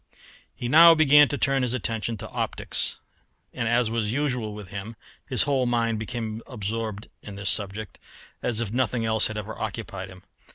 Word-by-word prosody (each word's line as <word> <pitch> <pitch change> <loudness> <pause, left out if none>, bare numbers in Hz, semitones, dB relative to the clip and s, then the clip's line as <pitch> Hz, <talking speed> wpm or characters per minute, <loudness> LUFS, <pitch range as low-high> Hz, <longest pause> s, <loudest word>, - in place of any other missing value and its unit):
He 120 - -4
now 165 +5 +8
began 150 -2 +6
to 145 - -3
turn 135 -1 +1
his 125 -1 0
attention 115 -1 -3
to 110 +1 -8
optics, - - -2 0.6
and, 115 - -2
as 120 -1 +2
was 110 -2 -1
usual 125 -6 -2
with 105 -3 -9
him, 100 +3 -7 0.3
his 125 -5 +6
whole 135 -3 +1
mind 115 -2 0
became 110 -1 -5
absorbed 110 -2 -4
in 100 - -9
this 100 -2 0
subject 105 +1 -3 0.4
as 115 -1 0
if 110 -3 -3
nothing 120 -1 0
else 110 -1 +4
had 110 - -6
ever 105 +1 -6
occupied 100 -3 -5
him. 90 0 -14
115 Hz, 175 wpm, -25 LUFS, 105-125 Hz, 0.6 s, now